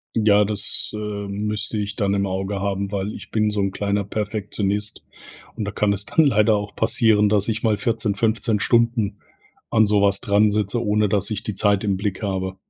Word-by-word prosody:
Ja, 105 -2 +4
das, 105 -1 -2
äh, - - -3
müsste 105 +1 -3
ich 105 0 -4
dann 100 -3 0
im 100 0 0
Auge 95 +1 -3
haben, 100 0 -2
weil 100 +1 -3
ich - - -11
bin 105 -1 +1
so 105 -1 -2
'n 100 0 0
kleiner 100 +1 -1
Perfektionist 105 0 -2 0.5
und 110 - -3
da 105 - -3
kann 105 0 +1
es 100 0 -2
dann 160 +7 +3
leider 110 -4 +3
auch 105 0 -4
passieren, 105 -3 +3
dass 105 +1 +1
ich 110 0 -2
mal 110 -3 +1
14, 110 -1 0
15 110 0 0
Stunden 115 -4 +1 0.5
an 110 -2 +4
sowas 100 -1 +3
dran 105 +1 +3
sitze, 105 +3 -1
ohne 105 0 +2
dass 100 0 0
ich 105 -1 -3
die 105 - -3
Zeit 100 0 +2
im 100 -2 +1
Blick 100 +1 -3
habe. 95 -1 -3
105 Hz, 200 wpm, -22 LUFS, 100-110 Hz, 0.5 s, Ja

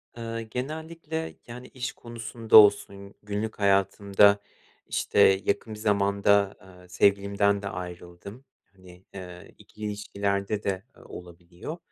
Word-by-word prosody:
Iıı, 115 0 -5
genellikle, 160 +7 -6
yani, 125 +1 -9
iş 125 -1 -5
konusunda 115 -1 +1
olsun, 100 -1 +4
günlük 105 +1 -4
hayatımda, 100 +1 +3 0.5
işte, 95 -1 +3
yakın 110 +2 -1
bir 105 - -9
zamanda, 100 -1 +2
ııı, 90 -1 -17
sevgilimden 100 +2 +2
de 100 - -5
ayrıldım. 90 +6 -9 0.3
Hani, 90 0 -17
ııı, 90 -1 -9
ikili 105 - -11
ilişkilerde 100 0 -2
de 95 -1 -2 0.2
olabiliyor 90 - -10
100 Hz, 110 wpm, -26 LUFS, 95-110 Hz, 0.5 s, olsun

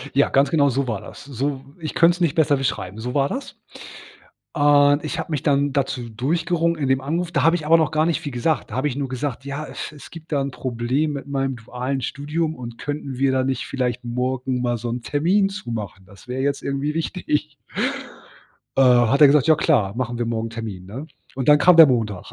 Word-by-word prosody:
Ja, 140 - +4
ganz 140 +1 +3
genau 145 -4 +3
so 135 0 -1
war 110 -4 -3
das. - - -11
So 135 0 -3 0.2
ich 160 -3 -5
könnt's 170 +1 +3
nicht 165 -5 +1
besser 150 -3 +3
beschreiben, 110 -6 -3
so 125 +2 -4
war 140 0 +2
das. 265 - -6 0.9
Und 145 -1 +4
ich 155 - -4
habe - - -4
mich 145 -1 -2
dann 140 -1 +2
dazu 130 -4 -2
durchgerungen 165 - 0
in 135 - 0
dem 130 0 +2
Anruf 165 +5 -2
da 145 -4 +1
habe 165 +2 +4
ich 155 - -7
aber 160 +2 +5
noch 155 -2 +1
gar 155 0 +2
nicht 170 - 0
viel 145 - -5
gesagt. 125 +1 -1
Da - - -5
habe 135 +3 +1
ich 130 - -3
nur 140 -2 -3
gesagt: 130 0 -4
„Ja, 140 +2 -5
äh, - - -11
es - - -6
es 150 -2 -13
gibt 165 -1 -12
da 145 - +1
'n 135 0 -3
Problem 130 +5 -1
mit 140 0 -6
meinem 135 -2 -2
dualen 125 +4 -4
Studium 155 +4 -3
und 120 -2 -8
könnten 145 -3 -5
wir 135 0 +2
da 130 0 +1
nicht 135 0 -2
vielleicht 125 -2 -2
morgen 125 +1 -2
mal 120 -1 0
so 120 +1 -6
'n 120 +1 -3
Termin 170 - +1
zu 195 -11 -7
machen, 100 -4 -6
das 100 +4 -17
wär 130 +1 -2
jetzt 140 +1 -1
irgendwie 140 +2 -2
wichtig.“ 155 -3 -2 1.2
Äh, 135 - +5
hat 125 +1 +4
er - - +11
gesagt: 140 -1 +4
„Ja 160 - +6
klar, 115 - +2
machen 120 -1 -3
wir 120 - -1
morgen 115 0 -2
'n - - -14
Termin, 110 -5 -6
ne,“ 125 +11 -8 0.3
und 130 0 -3
dann 150 0 +7
kam 180 +2 +6
der 160 - +11
Montag. 110 -7 -1
140 Hz, 230 wpm, -22 LUFS, 125-150 Hz, 1.2 s, er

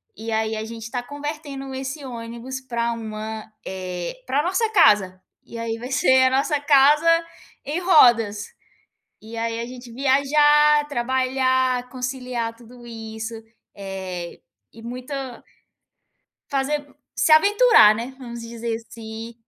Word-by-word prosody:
e 225 +1 -6
aí 220 0 0
a 215 - -4
gente 225 0 -8
tá 245 - -2
convertendo 285 0 -6
esse 270 +2 -5
ônibus 235 +2 -7
pra 235 -2 -2
uma, 220 -1 -6 0.2
eh, 180 -2 -5
pra 285 +3 +1
nossa 385 +6 0
casa. 195 - +4 0.2
E 235 - -10
aí 230 0 -3
vai 250 +3 -7
ser 260 -1 +4
a 260 - +3
nossa 290 +1 +1
casa 290 +2 +4 0.6
em 305 +4 -2
rodas. 235 - +4 0.8
E 225 +1 -10
aí 230 0 -2
a 235 - -3
gente 245 -1 -10
viajar, 295 +3 +4
trabalhar, 260 -1 0
conciliar 250 -2 -4
tudo 240 +1 -15
isso, 225 0 -7 0.4
eh, 190 -3 -6 0.3
e 225 - -13
muito 250 +4 -7 1.4
fazer 280 +1 0
mu 290 0 -21 0.2
se 315 - +3
aventurar, 405 - +6
né, 235 +4 -6
vamos 235 -2 -8
dizer 230 0 -4
assim. 225 0 -9
245 Hz, 130 wpm, -22 LUFS, 225-275 Hz, 1.4 s, aventurar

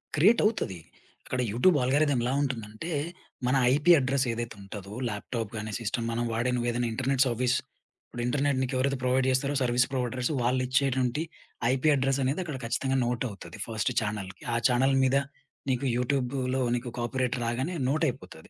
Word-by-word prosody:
క్రియేటవుతది. 210 - +3 0.5
అక్కడ 125 - -3
YouTube 145 - +4
algorithm 140 +1 +2
ఎలా 125 +2 0
ఉంటుందంటే 120 +2 -4 0.6
మన 130 - +3 0.2
ఐపీ 145 +5 +4
అడ్రెసేదైతే 125 -4 -1
ఉంటదో 100 0 -8 0.2
ల్యాప్‌టాప్‌గానీ, 110 0 -4
సిస్టమ్ 115 +1 -2
మనం 115 +1 -1
వాడే 120 +3 0
నువ్వేదైనా 120 0 0
ఇంటర్నెట్ 130 +2 +2
సర్వీస్ 125 +1 +1 0.5
ఇప్పుడు 120 - -6
ఇంటర్నెట్ 140 +1 +1
నీకెవరైతే 130 +1 0
ప్రొవైడ్ 130 +1 +2
జేస్తారో 135 +2 +1
సర్విస్ 120 -1 +3
ప్రొవైడర్స్ 125 -1 -1
వాళ్ళు 125 +2 +1
ఇచ్చేటువంటి 130 0 +1 0.5
ఐపీ 135 +3 +1
అడ్రెసనేది 135 +3 +1
అక్కడ 150 -6 -5
ఖచ్చితంగా 135 +3 0
నోటవుతది 120 -3 -4
ఫస్ట్ 110 +1 -1
చానెల్‌కి. 105 -3 -5
ఆ - - +1
చానెల్ 130 +2 +3
మీద 130 +1 +3 0.5
నీకు 130 +2 -1
యూట్యూబ్‌లో 130 0 0
నీకు 120 0 -4
కాపొరేట్ 125 +2 -1
రాగానే 130 +9 -1 0.2
నోటైపోతది. 125 - -2
125 Hz, 135 wpm, -28 LUFS, 120-135 Hz, 0.6 s, YouTube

